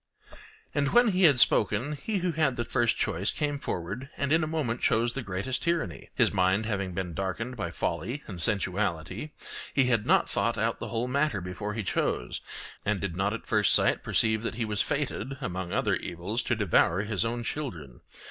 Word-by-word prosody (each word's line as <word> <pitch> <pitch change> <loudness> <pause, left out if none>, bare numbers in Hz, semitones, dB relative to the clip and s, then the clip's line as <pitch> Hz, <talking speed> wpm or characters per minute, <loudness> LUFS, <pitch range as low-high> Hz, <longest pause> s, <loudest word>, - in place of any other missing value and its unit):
And 140 -1 0
when 240 -1 +6
he 185 -2 +3
had 140 -6 +6
spoken, 110 +5 +3
he 175 +9 -3
who 180 - +2
had 155 -5 +1
the 120 - -2
first 120 -3 +1
choice 95 +5 0
came 145 -2 -2
forward 100 +7 -4
and 140 0 -1
in 160 +1 +4
a - - -1
moment 145 -7 -2
chose 115 +2 +2
the 135 - -3
greatest 105 +5 -2
tyranny; 170 - -2
his - - +3
mind 95 +3 +2
having 100 -4 -2
been 90 -3 -3
darkened 95 +8 -3
by 100 - -3
folly 140 +5 -3
and 90 -5 -7
sensuality, 95 - -1 0.5
he 135 - +5
had 115 -4 +1
not - - +4
thought - - 0
out - - 0
the - - -4
whole 120 +1 -2
matter 140 -4 +1
before 95 +4 -5
he 115 - -2
chose, - - -1 0.4
and 105 -1 0
did 90 -3 -3
not 95 +2 0
at 115 - -5
first 105 -3 +6
sight - - +3
perceive 110 -1 +2
that 115 - -3
he 115 -1 -1
was 105 -2 0
fated, 135 +5 -2
among 90 -1 -4
other - - +1
evils, 95 +8 -3
to 120 - 0
devour 95 -2 +2
his 105 -2 -1
own 120 +1 -2
children. 85 - -5
110 Hz, 195 wpm, -28 LUFS, 95-135 Hz, 0.5 s, when